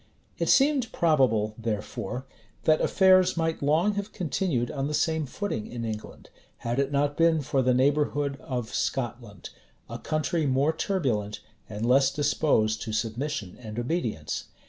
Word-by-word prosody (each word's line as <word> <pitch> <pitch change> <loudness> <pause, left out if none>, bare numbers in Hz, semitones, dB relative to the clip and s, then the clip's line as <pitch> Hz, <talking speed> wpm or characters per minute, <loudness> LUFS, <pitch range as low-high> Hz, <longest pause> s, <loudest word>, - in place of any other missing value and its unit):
[*] - - -38
It - - 0
seemed 275 -4 +3
probable, 125 -10 +2
therefore, 115 +3 -4 0.4
that 155 -1 +3
affairs 185 -2 +4
might 165 -1 -1
long 160 +8 +2
have 205 +1 -4
continued 150 - -1
on 140 -1 -2
the 150 - -2
same 160 -2 0
footing 130 - -4
in 120 -1 -5
England, 110 -1 -7 0.3
had 120 +3 -2
it 140 0 0
not 145 0 +1
been 165 -2 +3
for 135 0 +1
the 125 -1 +2
neighborhood 145 +1 +1
of 125 -4 -4
Scotland; 120 -6 -3 0.4
a - - -7
country 155 +1 -1
more 135 +4 +2
turbulent, 110 - -1 0.3
and 105 +1 -4
less 135 +2 +4
disposed 140 -6 +1
to 110 - -4
submission 115 -1 -3
and 110 -2 -8
obedience. 120 - -2
140 Hz, 150 wpm, -27 LUFS, 115-160 Hz, 0.4 s, affairs